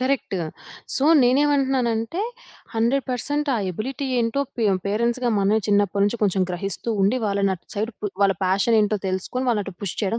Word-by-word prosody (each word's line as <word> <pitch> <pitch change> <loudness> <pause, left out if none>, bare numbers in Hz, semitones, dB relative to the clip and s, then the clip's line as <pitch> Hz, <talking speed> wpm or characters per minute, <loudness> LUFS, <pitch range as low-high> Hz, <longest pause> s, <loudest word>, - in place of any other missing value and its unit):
Correct. 255 -7 -1 0.6
So, 270 - +1 0.2
నేను 250 +2 +4
ఏమంటున్నానంటే, 265 - +1 0.5
100% 270 +4 0
ఆ - - +1
ఎబిలిటీ 260 +9 -4
ఏంటో 230 +3 0 0.2
పే 230 - 0 0.2
పేరెంట్స్‌గా 235 +4 0
మనమే 200 +2 +3
చిన్నప్పడి 205 -1 +2
నుంచి 210 +3 -1
కొంచెం 195 -2 +2
గ్రహిస్తూ 195 +5 -3
ఉండి, 210 +7 +3
వాళ్ళనటు 200 -3 0
సైడ్ 220 +3 -2
పు 205 -2 -3
వాళ్ళ 195 -1 +4
ఫ్యాష‌న్ 195 +5 +2
ఏంటో 210 0 +1
తెలుసుకొని, 190 +8 -2
వాళ్ళనటు 210 -3 +1
అటు 195 -2 -9
పుష్ 195 - -4
చేయడం 220 +2 0
225 Hz, 160 wpm, -23 LUFS, 200-255 Hz, 0.6 s, నేను